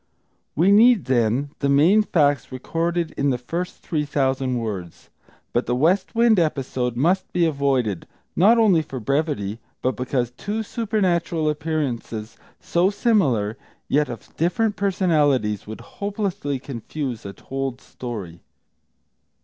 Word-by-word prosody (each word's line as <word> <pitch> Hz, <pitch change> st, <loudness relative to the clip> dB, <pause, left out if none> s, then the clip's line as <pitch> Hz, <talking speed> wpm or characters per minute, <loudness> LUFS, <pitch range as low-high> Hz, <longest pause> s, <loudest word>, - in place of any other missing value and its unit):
We 180 Hz, +6 st, +4 dB
need, 225 Hz, +1 st, +6 dB
then, 130 Hz, +3 st, +1 dB
the 140 Hz, -, 0 dB
main 160 Hz, +10 st, +5 dB
facts 145 Hz, -, +1 dB
recorded 165 Hz, +6 st, -2 dB
in 140 Hz, 0 st, +2 dB
the 125 Hz, -, +1 dB
first 170 Hz, +9 st, -5 dB
three 155 Hz, -3 st, -1 dB
thousand 130 Hz, -3 st, 0 dB
words. 100 Hz, -7 st, -6 dB, 0.4 s
But -, -, 0 dB
the 120 Hz, -, +1 dB
West 175 Hz, -, +1 dB
Wind 230 Hz, -3 st, +5 dB
episode 130 Hz, -6 st, -1 dB
must 180 Hz, +8 st, +1 dB
be 175 Hz, -1 st, +2 dB
avoided, 135 Hz, -, 0 dB, 0.3 s
not 215 Hz, +7 st, +5 dB
only 200 Hz, -8 st, +5 dB
for 135 Hz, -4 st, -7 dB
brevity, 120 Hz, -4 st, -1 dB, 0.2 s
but 130 Hz, -2 st, +1 dB
because 125 Hz, 0 st, -1 dB
two 210 Hz, -, -4 dB
supernatural 185 Hz, -8 st, 0 dB
appearances, 135 Hz, -8 st, -3 dB, 0.2 s
so 175 Hz, +2 st, +2 dB
similar, 140 Hz, -, +1 dB, 0.3 s
yet 150 Hz, 0 st, +2 dB
of 115 Hz, -4 st, -9 dB
different 210 Hz, +6 st, +1 dB
personalities, 150 Hz, -, +1 dB
would 110 Hz, +2 st, -7 dB
hopelessly 195 Hz, -, -3 dB
confuse 130 Hz, -1 st, -5 dB
a 100 Hz, -, -6 dB
told 135 Hz, +4 st, -4 dB
story. 105 Hz, -12 st, -7 dB
145 Hz, 130 wpm, -23 LUFS, 125-180 Hz, 0.4 s, need